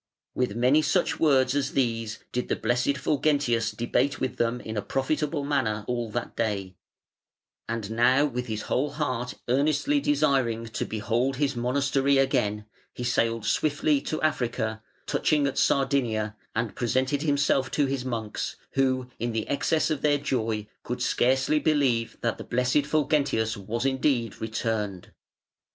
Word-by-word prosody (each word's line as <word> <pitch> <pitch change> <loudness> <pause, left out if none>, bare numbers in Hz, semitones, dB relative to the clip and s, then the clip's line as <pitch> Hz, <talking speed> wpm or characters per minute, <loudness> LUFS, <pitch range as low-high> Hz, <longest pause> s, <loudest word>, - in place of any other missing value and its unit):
With 125 -5 -1
many 125 +6 +4
such 165 +4 +1
words 135 -5 +4
as 140 -1 -1
these 115 -4 0
did 125 - -2
the - - +2
blessed 125 +4 0
Fulgentius 140 -5 +1
debate 130 +4 0
with 130 - -2
them 120 +1 0
in 110 -1 -6
a 105 - 0
profitable 145 +5 -1
manner 110 -8 0
all 120 -2 -2
that 120 +2 -4
day, 100 -5 -2 0.9
and 115 -2 -3
now 125 +5 +4
with 125 -3 -3
his 110 -1 -3
whole 140 +4 0
heart 130 -5 -2
earnestly 150 - +2
desiring 135 - +1
to - - -3
behold 115 +5 -1
his 140 -1 0
monastery 135 +3 +1
again, 105 -6 +1 0.3
he 125 - -5
sailed 115 -2 0
swiftly 145 +3 +1
to 155 - -3
Africa, 115 -7 -1 0.2
touching 150 -2 +1
at 140 - -1
Sardinia, 120 -6 +1 0.2
and 115 -1 -1
presented 130 +4 0
himself 140 -3 +2
to 145 - +1
his 135 -1 -2
monks, 115 -4 -3 0.2
who, 130 -2 +1
in 120 0 -2
the 110 -1 -2
excess 155 +3 +1
of 150 - -1
their 145 -1 +3
joy, 115 -7 -1 0.2
could - - -4
scarcely 130 +4 +2
believe 135 -7 +1
that - - -1
the - - -5
blessed 125 +4 +1
Fulgentius 145 -7 +1
was 110 +5 -3
indeed 130 -4 0
returned". 110 -4 -3
125 Hz, 150 wpm, -26 LUFS, 115-140 Hz, 0.9 s, many